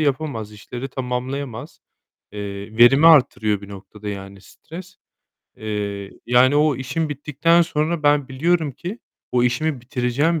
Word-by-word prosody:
yapamaz, 135 -7 -2
işleri 120 +5 -7
tamamlayamaz. 130 -1 -5 0.5
Eee, 100 +1 -7
verimi 135 +6 +7
artırıyor 110 -9 +4
bir 100 - -11
noktada, 105 +1 -10
yani, 100 -1 -7
stres. 175 - -12 0.6
Eee, 100 -2 -4 0.2
yani 125 +3 +4
o 150 -2 +3
işim 150 +5 -2
bittikten 150 +4 +2
sonra 160 0 -1
ben 145 -2 +3
biliyorum 155 +2 0
ki 180 - -7 0.3
o 125 -1 +3
işimi 135 +3 0
bitireceğim 130 +6 0
130 Hz, 125 wpm, -21 LUFS, 110-155 Hz, 0.6 s, verimi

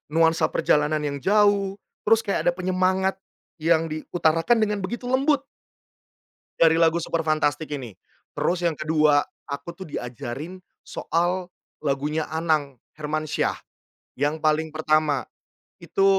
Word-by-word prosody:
nuansa 165 0 +4
perjalanan 150 +1 +1
yang 140 -1 -2
jauh, 200 +1 +3 0.3
terus 225 +1 +5
kayak 200 -3 -1
ada - - +6
penyemangat 185 +1 +1 0.4
yang 165 0 +2
diutarakan 165 +7 +1
dengan 210 -1 0
begitu 225 +6 -4
lembut 275 +2 +2 1.2
dari 165 -1 +6
lagu 165 0 +3
"Superfantastic" 155 -2 0
ini. 125 -8 -5 0.4
Terus 175 0 0
yang 165 - -1
kedua, 150 -1 +3 0.2
aku 140 +4 -5
tuh 190 - -9
diajarin 125 +9 -6 0.2
soal 175 +2 -1 0.3
lagunya 150 +2 -1
Anang 155 -4 0 0.2
Hermansyah, 155 0 -1 0.6
yang 145 +4 0
paling 155 +1 +1
pertama 155 -4 +1 0.5
itu 185 +3 +1
160 Hz, 115 wpm, -24 LUFS, 150-185 Hz, 1.2 s, ada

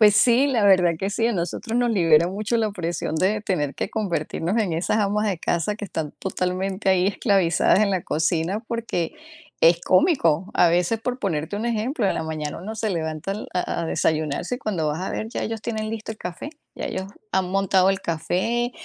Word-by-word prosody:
Pues 210 -1 +7
sí, 240 +5 +5
la 240 -7 +1
verdad 180 -3 +5
que 195 +4 -2
sí, 225 +2 +1
a 235 - +1
nosotros 200 +6 -3
nos 245 -1 +2
libera 170 -4 +4
mucho 215 +4 -1
la 220 -2 +1
presión 170 -4 -3
de 200 +6 +1
tener 155 -9 -1
que - - -3
convertirnos 175 -2 -2
en 205 -7 +1
esas 170 +6 0
amas 210 +1 +1
de 185 - -2
casa 175 +5 0
que 210 - -6
están 160 -6 -4
totalmente 190 +1 -2
ahí 190 0 +4
esclavizadas 195 -2 +3
en 205 -2 +3
la 185 -3 0
cocina, 165 +5 0
porque 225 -8 -2 0.5
es 165 +1 +5
cómico. 185 - +2
A 175 - +5
veces, 180 +6 +1
por 250 +2 -3
ponerte 165 -2 -2
un 220 +3 -2
ejemplo, 235 +1 0
en - - +1
la - - -2
mañana 155 -2 -4
uno 215 +5 -6
se 220 -2 -1
levanta 160 +1 -3
al 210 - -6
a 180 -1 -1
a - - -2
desayunarse, 155 - 0
y - - -6
cuando 180 - -2
vas 150 +3 -2
a 190 - -3
ver 220 - -3
ya - - -3
ellos 225 0 -3
tienen 220 -1 -3
listo 220 -1 -5
el 220 - -15
café, 180 - -6 0.3
ya - - -4
ellos 190 0 -4 0.3
han 185 -1 +1
montado 195 -1 +3
el 195 - -1
café, 190 +9 -1
190 Hz, 210 wpm, -23 LUFS, 170-215 Hz, 0.5 s, Pues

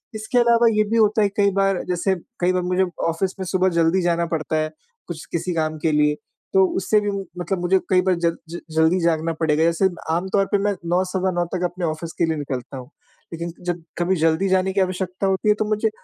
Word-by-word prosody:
इसके 215 +3 -2
अलावा 235 0 +4
ये 215 - +5
भी 230 - +1
होता 215 0 +3
है 205 - +3
कई 200 -1 +3
बार 195 -1 +1
जैसे 180 +2 0 0.2
कई 180 +1 +2
बार 185 - +1
मुझे 180 +1 +1 0.3
ऑफ़िस 185 +3 -2
में 190 - -3
सुबह 185 +1 +2
जल्दी 165 +3 +3
जाना 170 -1 +1
पड़ता 160 -1 -2
है, 155 0 0 0.4
कुछ 165 -3 -7
किसी 175 +1 -2
काम 155 -1 -1
के 160 +1 +1
लिए 150 0 +2 0.4
तो 190 0 +6
उससे 195 +3 +2
भी 205 0 -1 0.3
मतलब 185 +1 -2
मुझे 185 +2 +3
कई 185 -1 +4
बार 185 0 +2
ज 170 -1 0
ज 170 +1 -6 0.2
जल्दी 160 +3 +3
जागना 165 -1 +1
पड़ेगा। 160 -1 +2
ऐसे 170 +3 +2 0.2
आमतौर 190 +4 +1
पे 205 - +4
मैं 205 +1 0 0.2
9 180 +2 +2
सवा 185 0 -1
9 175 -1 0
तक 180 - -2
अपने 175 0 -3
ऑफ़िस 160 +1 -4
के - - +4
लिए 160 -1 -1
निकलता 135 -2 -5
हूँ। 125 0 -10 0.4
लेकिन 170 0 -5
जब 175 -1 -2 0.2
कभी 175 +2 +1
जल्दी 165 +4 +2
जाने 190 0 +2
की 195 - +2
आवश्यकता 185 +1 -2
होती 190 +2 +1
है 210 - +5
तो 215 - +1
मुझे 215 +1 +1
180 Hz, 230 wpm, -22 LUFS, 165-190 Hz, 0.4 s, तो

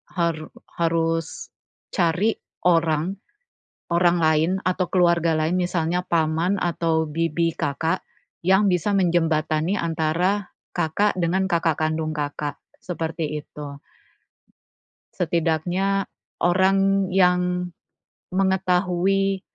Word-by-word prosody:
haru 165 -3 -1 0.3
harus, 165 - -1 0.4
cari, 180 +5 +1 0.3
orang, 165 +1 +2 0.8
orang 175 0 +3
lain 160 +1 +3
atau 185 0 0
keluarga 170 -3 +3
lain 160 +4 +1
misalnya 175 -1 0
paman 165 +3 +1
atau 165 -2 +1
bibi 165 +2 0
Kakak, 160 +5 -1 0.5
yang 190 +1 +4
bisa 200 +4 +1
menjembatani 165 -1 +1
antara, 170 +4 0 0.2
Kakak 175 +5 +1
dengan 185 +3 +1
kakak 165 -2 +2
kandung 155 0 -1
Kakak, 145 0 -3 0.2
seperti 160 -3 -4
itu. 145 -1 -9 1.3
Setidaknya, 175 +4 0 0.3
orang 195 +2 +2
yang 180 -1 +2 0.6
mengetahui 190 0 +1
170 Hz, 90 wpm, -23 LUFS, 160-185 Hz, 1.3 s, yang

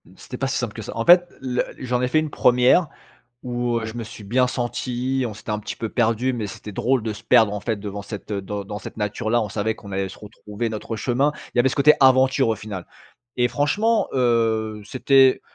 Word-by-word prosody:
C'était 125 - -9
pas 135 - -1
si 130 - -1
simple 120 -4 -3
que 110 - -7
ça. - - -8
En 115 - -1
fait, 175 0 +7
le 125 -2 -1 0.2
j'en 125 -1 -1
ai 125 - +1
fait 155 +5 +2
une 155 0 -2
première 125 +8 +4 0.6
où, 120 -1 -1
heu, 110 - -4
je 110 - -7
me 120 -1 -5
suis 110 -1 -11
bien 125 +5 +2
senti, 125 +1 -2
on 110 - -6
s'était 105 - -9
un 105 - -1
petit 105 0 -6
peu 115 - -4
perdus 120 +2 +1
mais 115 -4 -3
c'était 100 +1 -9
drôle 125 +4 +1
de 110 0 -2
se 105 - -11
perdre, 110 -2 +5
en 105 - -3
fait, 115 +2 -2
devant 100 0 -6
cette, 105 +1 -8
heu, 100 -1 -1
dans 100 +1 -5
dans 105 +1 -6
cette - - -10
nature 105 0 -3
là, 120 +1 +3
on 105 - -4
savait 110 +2 -1
qu'on 100 - -12
allait 95 0 -2
se 95 - -12
retrouver 105 +2 -6
notre 110 +1 -5
chemin. 135 +6 +1 0.2
Il - - -1
y - - +8
avait 130 - +4
ce - - -3
côté 150 +1 +6
aventure 130 0 +4
au 110 - +1
final 100 -4 -7 0.5
et 125 0 +2
franchement, 200 - +1
heu, 115 -4 +1
c'était 130 +3 +4
120 Hz, 245 wpm, -22 LUFS, 105-130 Hz, 0.6 s, y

